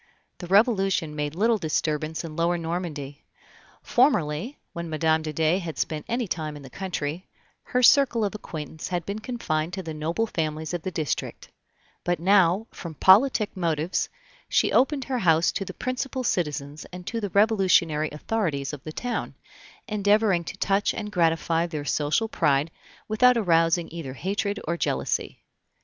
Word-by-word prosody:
The 175 - -7
Revolution 195 - +2
made 150 0 -3
little 220 +4 +2
disturbance 155 -1 -1
in 160 -2 -7
Lower 170 +1 +1
Normandy. 160 -4 -5 0.6
Formerly, 240 - +1 0.2
when 170 -1 -5
Mme. 160 0 +2
de 155 -1 -4
Dey 160 +4 +2
had 170 -4 -6
spent 155 -1 -2
any 235 -1 -1
time 155 -4 -3
in 145 - -11
the 135 - -12
country, 175 -2 -4 0.4
her 250 0 0
circle 245 -4 +5
of 200 - -2
acquaintance 160 -6 -7
had 175 -2 -2
been 200 +2 -4
confined 180 -9 -2
to 190 0 -4
the 160 -2 -5
noble 165 +8 -1
families 160 -4 -3
of 175 - -2
the 185 - -3
district; 155 -7 -3 0.5
but 175 0 0
now, 190 +2 +4
from 170 -4 -8
politic 210 - +5
motives, 165 -1 -1 0.4
she - - +2
opened 270 +1 +3
her 255 -1 -2
house 165 -4 +3
to 200 - -3
the - - -6
principal 255 +1 -3
citizens 150 - -2
and 180 0 -9
to 230 +3 -3
the 205 - -2
Revolutionary 185 -6 +3
authorities 150 -5 -2
of 145 - -8
the 155 - -6
town, 245 +9 -4 0.5
endeavoring 205 -4 +2
to 190 - -7
touch 200 +1 +1
and 210 -1 -5
gratify 165 -1 +1
their 155 -4 -5
social 150 +10 +1
pride 145 -6 +1 0.4
without 245 +3 +4
arousing 165 -4 +3
either 160 -6 -6
hatred 200 +6 -2
or 170 +1 0
jealousy. - - -2
175 Hz, 160 wpm, -25 LUFS, 155-205 Hz, 0.6 s, circle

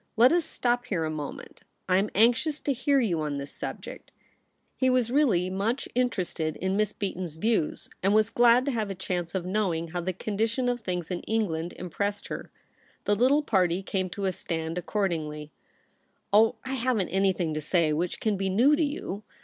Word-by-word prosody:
Let 240 +3 +7
us 340 -1 +2
stop 245 -5 -1
here 165 -6 -1
a 155 - -2
moment. 150 -2 -7 0.3
I 185 -1 +4
am 205 +2 0
anxious 250 - +3
to 280 - 0
hear 275 +2 +2
you 180 -10 +1
on 150 -2 -2
this 140 0 -6
subject.' - - -7 0.7
He 260 - +2
was 250 -2 +2
really 240 -11 +3
much 210 +7 -1
interested 185 -10 -1
in 190 +1 -1
Miss 210 0 +1
Beaton's 185 -6 -4
views, 215 -2 0
and 195 - +2
was 215 0 +3
glad 240 +1 +5
to 280 - 0
have 220 -4 -2
a 195 - -4
chance 180 -1 -3
of 180 -2 -1
knowing 180 -4 -1
how 175 +2 -3
the 185 +2 -1
condition 220 +6 -1
of 245 0 -1
things 180 -4 -3
in 180 - -2
Eng 220 -1 +1
land 160 +2 -3
impressed 200 +4 -3
her. - - -6 0.6
The 205 - +3
little 265 +7 +3
party 185 -6 +1
came 190 -1 -2
to 200 +2 -4
a 190 - +2
stand 165 -1 -3
accord 190 +3 0
ingly. 150 -2 -5 0.4
' - - -39
Oh, 220 +2 +5
I 265 - -3
haven't 240 -7 0
anything 190 -4 +1
to 155 - -2
say 155 0 +2
which 170 +4 -2
can 215 -3 0
be 195 0 -1
new 245 +10 +5
to 320 - +1
you. 285 -9 -3
195 Hz, 200 wpm, -27 LUFS, 175-235 Hz, 0.7 s, Let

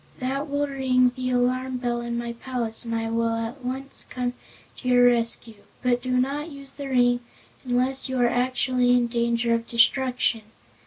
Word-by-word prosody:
That 275 +3 -3
will 285 +1 0
ring 260 -3 +2
the 255 -1 -2
alarm 255 +1 0
bell 240 -1 -2
in 235 0 -3
my 235 0 -3
palace 235 -2 -3
and 230 0 -2
I 225 0 -2
will 230 0 +1
at 230 +4 -5
once 265 +2 -4
come 250 -1 -2 0.4
to 255 - -7
your 245 0 +5
rescue. 230 -3 +2 0.2
But 245 -1 +2
do 255 - -5
not 275 +5 0
use 275 -2 -10
the 280 -1 -6
ring 245 -1 +3 0.4
unless 255 +2 +1
you 260 - -2
are 245 - +4
actually 250 0 +1
in 245 -1 +3
danger 235 0 0
of 230 0 -1
destruction. 245 -1 +2
250 Hz, 175 wpm, -25 LUFS, 235-260 Hz, 0.4 s, your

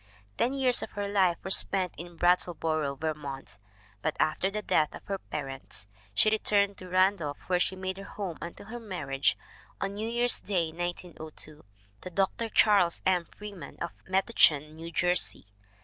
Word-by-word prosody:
Ten 255 - +1
years 260 -2 +4
of - - -6
her 205 -1 -2
life 190 -4 +3
were 190 - -3
spent 190 -2 +4
in 175 0 -9
Brattleboro, 160 -4 +1
Vermont, 140 -6 -4 0.4
but - - -1
after 155 +5 +2
the 210 +1 -4
death 155 -5 +2
of - - -11
her 195 -1 -3
parents 135 - -5 0.3
she 215 - +5
returned 200 -2 +3
to 185 - -9
Ran 185 +2 +4
dolph 145 -4 -4
wtyere 180 -1 +2
she 190 - +1
made 185 0 -4
her - - -7
home 190 -6 -5
until 170 +3 -7
her 240 +3 -7
marriage 145 -11 0 0.4
on 195 0 -2
New 215 +2 -3
Year's 240 +1 +2
Day, 175 -5 -1
1902, 160 -3 -5 0.4
to - - -6
Dr. 195 +5 0
Charles 200 -6 +4
M. 180 -2 +3
Freeman 200 -8 -9
of - - -3 0.2
Metuchen, 160 -6 +3
New 165 +1 -7
Jersey. 180 - +1
180 Hz, 165 wpm, -29 LUFS, 160-200 Hz, 0.4 s, she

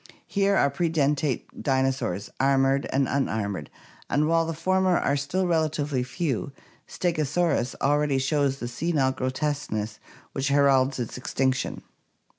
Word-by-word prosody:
Here 200 0 +1
are 140 -6 +3
predentate 150 -4 0
dinosaurs, 130 - 0
armored 135 0 +3
and 135 0 +2
unarmored, 100 - -2 0.4
and 150 +1 +2
while 165 0 +2
the 165 - -2
former 185 +1 +2
are - - +1
still 145 +7 -1
relatively 155 -5 0
few, 135 - -2 0.4
Slegosaurus 155 -5 0
already 145 0 +2
shows 135 0 +1
the 120 - -5
senile 135 +1 0
grotesqueness 130 -5 -2 0.3
which 135 +1 -2
heralds 140 -1 +3
its 120 0 -4
extinction. 130 0 -1
140 Hz, 120 wpm, -26 LUFS, 130-155 Hz, 0.4 s, are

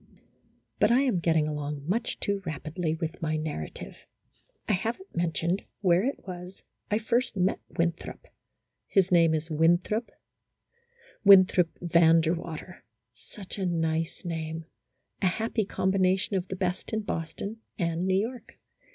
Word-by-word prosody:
But - - +5
I 250 +3 +5
am 255 -10 +1
getting 160 -2 +2
along 150 -1 -4
much 225 +6 -1
too 200 -1 -1
rapidly 160 0 -3
with 160 +2 -5
my 155 -1 0
narrative. 150 - -6 0.6
I - - +2
have 220 +5 -1
n't 380 - -16
mentioned 170 +2 0 0.2
where 180 -1 +4
it 275 +4 -3
was 180 +1 -8 0.3
I 210 - +2
first 230 0 0
met 185 +1 +1 0.2
Winthrop; 170 0 -2 0.6
his 190 -2 +2
name 165 -2 +5
is 160 +1 -4
Winthrop, 175 +8 +2 1.1
Winthrop 185 -4 +6
Van 170 -1 +5
der 160 +1 +1
Water; 170 0 -7 0.3
such 190 - -10
a 190 - 0
nice 165 0 -1
name; 160 -1 -4 0.6
a 190 - +3
happy 220 +3 -1
combi 190 0 0
nation 190 +2 +2
of 185 -1 -1
the 190 - -4
best 180 -1 -2
in 220 - +1
Boston 195 +3 -4 0.2
and 170 0 -1
New 190 0 +3
York. 250 0 -12
175 Hz, 145 wpm, -28 LUFS, 160-195 Hz, 1.1 s, Winthrop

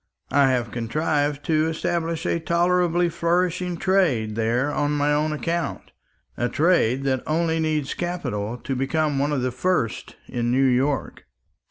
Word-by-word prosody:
I 140 -1 +4
have 120 -3 0
contrived 145 +5 -1
to 155 -1 +2
establish 165 +1 -2
a 170 - 0
tolerably 175 +1 +2
flourishing 175 +1 0
trade 165 - +1
there 120 +5 0
on 145 +1 0
my 145 0 +1
own 150 +1 +1
account; 165 +2 -3 0.4
a 120 - -1
trade 145 -6 +2
that 130 -2 0
only 165 +1 +1
needs 155 -3 -1
capital 125 -11 -3
to 135 +2 -4
become 145 +2 0
one 145 +2 +1
of 135 -4 0
the 130 - 0
first 125 -4 -1
in 120 -1 -2
New 135 +2 +3
York." 130 +2 0
150 Hz, 150 wpm, -23 LUFS, 130-170 Hz, 0.4 s, I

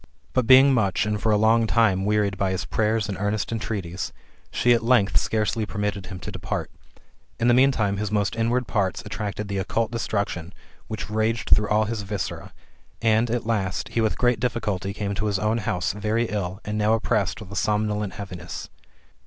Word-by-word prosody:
But 130 -3 +1
being 135 +1 +8
much, 100 -6 +1
and 105 -1 -1
for 110 - +2
a 105 - +4
long 110 +2 +4
time, 100 -5 +3
wearied 105 -1 +1
by 95 0 0
his 95 0 -2
prayers 110 -1 0
and 100 - -3
earnest 105 +2 -1
entreaties, 100 -6 -3 0.4
she 120 - +3
at 115 - +1
length 115 -4 +3
scarcely 110 +1 0
permitted 105 -2 -3
him 95 -1 -7
to - - -6
depart. - - -4 0.7
In 115 - +2
the 120 - +6
meantime, 120 -6 +3
his 105 0 -2
most 100 -3 0
inward 120 +2 +1
parts 95 -5 -1
attracted 105 0 -4
the 100 -1 -2
occult 110 +3 -1
destruction 100 -6 -3 0.3
which 110 -1 -5
raged 110 +1 0
through 105 0 +5
all 110 0 +3
his 110 0 -3
viscera; 100 -1 -5 0.5
and, 115 +1 +2
at 120 -1 -1
last, 100 -5 -1
he 115 - 0
with 110 -1 0
great 120 -2 +2
difficulty 105 -6 -1
came 100 0 -3
to 105 +2 -2
his 100 -2 +1
own 110 +3 0
house, 95 -6 -1
very 110 +3 0
ill, 95 -2 -3
and 105 0 -2
now 105 +1 +3
oppressed 110 -3 0
with 105 -3 -10
a - - -6
somnolent 105 0 0
heaviness. 95 -3 -7
105 Hz, 190 wpm, -24 LUFS, 100-115 Hz, 0.7 s, being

